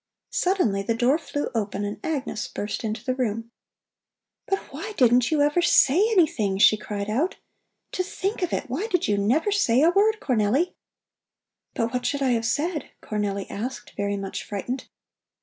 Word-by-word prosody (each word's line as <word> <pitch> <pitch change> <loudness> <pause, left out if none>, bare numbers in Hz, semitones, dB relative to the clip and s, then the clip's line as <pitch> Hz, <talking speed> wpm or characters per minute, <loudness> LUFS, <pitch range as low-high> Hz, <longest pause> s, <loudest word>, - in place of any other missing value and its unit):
Suddenly 360 - +1
the 225 +3 -1
door 255 +7 +3
flew 290 -3 -4
open 205 -3 -2
and 205 +1 -5
Agnes 275 -8 -2
burst 205 +3 -4
into 220 0 -4
the 255 - +1
room. 230 -2 -2 1.0
"But 390 - +1 0.2
why 435 - -6
didn't 245 -2 +4
you 300 -2 +3
ever 295 +4 +2
say 285 -5 +5 0.2
anything?" 310 - +2
she 210 - +6
cried 205 -1 -5
out. 275 - 0 0.6
"To 370 - -1
think 390 +2 -3
of 360 - -1
it! 290 - -2
Why 290 - -2
did 360 -7 0
you 205 -1 +1
never 275 - +2
say 275 - +3
a 335 - +6
word, 430 +4 +3
Cornelli?" 255 - +1 1.0
"But 230 -2 -1
what 250 0 -1
should 285 -1 -1
I 260 - +2
have 230 -1 +1
said?" 305 +2 -1
Cornelli 200 -2 -2
asked, 215 0 -5
very 200 0 -1
much 195 -1 -5
frightened. 245 +6 -4
250 Hz, 170 wpm, -25 LUFS, 210-325 Hz, 1.0 s, she